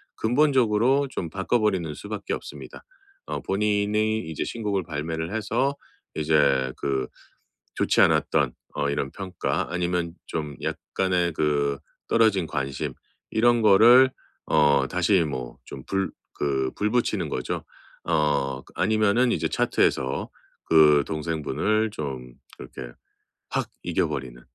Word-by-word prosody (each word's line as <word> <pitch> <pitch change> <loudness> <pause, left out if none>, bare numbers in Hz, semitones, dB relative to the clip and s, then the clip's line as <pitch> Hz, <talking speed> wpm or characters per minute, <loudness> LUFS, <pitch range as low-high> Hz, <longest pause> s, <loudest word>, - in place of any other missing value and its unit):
근본적으로 130 0 +3
좀 85 - -4
바꿔 95 +7 0
버리는 95 -8 0
수밖에 105 +4 -5
없습니다. - - -8 0.4
어 - - -3
본인이 105 +2 +1
이제 80 -2 -3
신곡을 105 -4 -2
발매를 80 +2 -4
해서 115 +6 0 0.4
이제 70 -4 +2
그 65 -2 -1 0.7
좋지 - - +2
않았던 60 - +3 0.2
어 70 -1 0
이런 70 -1 -2
평가 95 -2 -3
아니면 90 -1 -1
좀 75 -2 -4
약간의 90 -3 -1
그 70 -2 0 0.3
떨어진 105 -7 +3
관심 70 -3 -3 0.4
이런 120 +1 +3
거를 115 +6 +7 0.4
어 75 -3 +3
다시 90 +1 +2
뭐 65 -5 -5
좀 - - -9
불 95 0 -1 0.3
그 65 -2 0
불 105 - 0
붙이는 120 0 0
거죠. 65 - -3 0.4
어 70 -5 0
그 - - -20
아니면은 110 +3 +2
이제 - - 0
차트에서 65 -1 0 0.4
그 75 -3 +6
동생분을 85 +8 -1
좀 65 -8 -6 0.2
그렇게 - - -9 0.6
확 - - -1
이겨 - - 0
버리는 60 -2 -6
85 Hz, 250 characters per minute, -25 LUFS, 70-105 Hz, 0.7 s, 거를